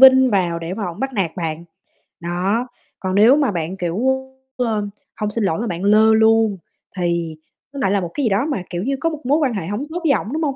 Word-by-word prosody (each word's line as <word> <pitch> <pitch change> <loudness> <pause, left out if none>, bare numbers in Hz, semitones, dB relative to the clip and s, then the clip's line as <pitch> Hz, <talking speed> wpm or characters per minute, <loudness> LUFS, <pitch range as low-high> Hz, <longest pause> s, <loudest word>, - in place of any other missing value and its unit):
vin 260 -1 +8
vào 175 -4 +1
để 170 +2 -5
mà 210 - -3
ổng 175 +3 -7
bắt 270 0 -2
nạt 190 -8 0
bạn. 165 -1 -3 0.6
Đó, 185 +8 -1 0.3
còn 185 0 -2
nếu 220 +6 +7
mà 285 -5 +2
bạn 175 +1 -3
kiểu, 175 -1 -2 0.6
ơ, 220 -4 0 0.3
hông 210 - 0
xin 230 +1 -1
lỗi 165 -5 0
mà 235 - -2
bạn 175 -2 -4
lơ 215 +2 +5
luôn, 220 -2 +4 0.4
thì 170 -2 -1 0.4
nó 280 - -6
lại 225 -8 +1
là 200 - +2
một 175 -2 -5
cái 290 - -2
gì - - +3
đó 205 +7 +1
mà, 275 - -2
kiểu 175 0 -3
như, 275 +4 0
có 330 - +1
một 305 -3 -8
mối 280 +4 +3
quan 280 -7 +1
hệ 180 -5 -4
hổng 205 +6 -3
tốt 345 +2 -3
với 315 - +3
ổng, 245 -2 -1
đúng 320 +1 -1
hông? 280 -3 0
210 Hz, 250 wpm, -20 LUFS, 175-260 Hz, 0.6 s, vin